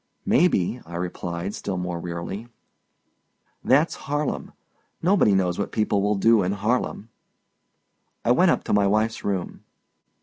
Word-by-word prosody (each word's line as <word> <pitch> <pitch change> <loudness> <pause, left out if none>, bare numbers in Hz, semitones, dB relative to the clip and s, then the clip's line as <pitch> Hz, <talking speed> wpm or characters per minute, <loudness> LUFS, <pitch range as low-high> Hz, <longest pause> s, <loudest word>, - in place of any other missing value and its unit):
"May 175 +6 +5
be," 115 - -1
I 85 - -10
replied, 90 +1 -4
still 95 -3 -4
more 90 -1 -3
wearily. 85 +6 -5 1.2
"That's 145 +6 +3 0.2
Harlem. 145 0 -2 0.5
Nobody 175 - +4
knows 90 -1 0
what 100 - -2
people 105 -2 +1
will 105 +1 +1
do 115 +2 +4
in 95 +1 0
Harlem." 110 +1 -1 1.2
I - - +4
went - - +5
up - - +1
to - - -2
my 100 -1 +4
wife's 110 +3 0
room. 95 -3 -3
100 Hz, 140 wpm, -24 LUFS, 90-115 Hz, 1.2 s, May